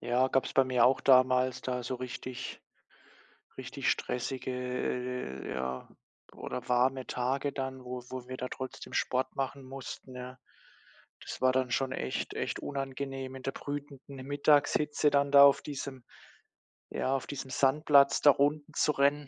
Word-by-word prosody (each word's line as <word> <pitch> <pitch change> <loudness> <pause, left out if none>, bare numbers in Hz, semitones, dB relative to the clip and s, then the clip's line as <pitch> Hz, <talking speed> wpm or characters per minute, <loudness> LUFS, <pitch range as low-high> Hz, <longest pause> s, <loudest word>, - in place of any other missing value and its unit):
Ja, 125 +2 +2
gab's 135 - 0
bei 135 - +5
mir 125 -2 +3
auch 130 +1 +4
damals 130 -1 +4
da 125 -1 -2
so 125 +2 -3
richtig 125 0 -6 1.0
richtig - - -2
stressige, 125 +1 -2
äh 125 - -3
äh - - -4
ja, 65 0 -4 0.4
oder 125 - -6
warme 130 +1 +2
Tage 135 +3 -1
dann, 130 -1 -5
wo 125 0 -5
wo 130 -1 -7
wir 130 - -5
da 125 - -4
trotzdem 130 0 -7
Sport 130 +1 -1
machen 135 0 -3
mussten, 130 0 -8
ja. 125 +1 -8 0.8
Das - - -7
war 130 0 +4
dann 130 -1 0
schon 130 +1 0
echt 65 - -3
echt - - -3
unangenehm 135 -1 -4
in 130 - -9
der 135 - -2
brütenden 140 -1 -7
Mittagshitze, 145 +1 +3
dann 140 0 +2
da 140 0 +10
auf 140 - +6
diesem 135 -3 -6 0.9
ja, 135 - 0
auf 135 - -3
diesem 135 -1 -6
Sandplatz 140 +1 +4
da 145 - +8
Runden 145 +2 0
zu 150 - +2
rennen. 140 +1 +2
130 Hz, 155 wpm, -30 LUFS, 125-140 Hz, 1.0 s, da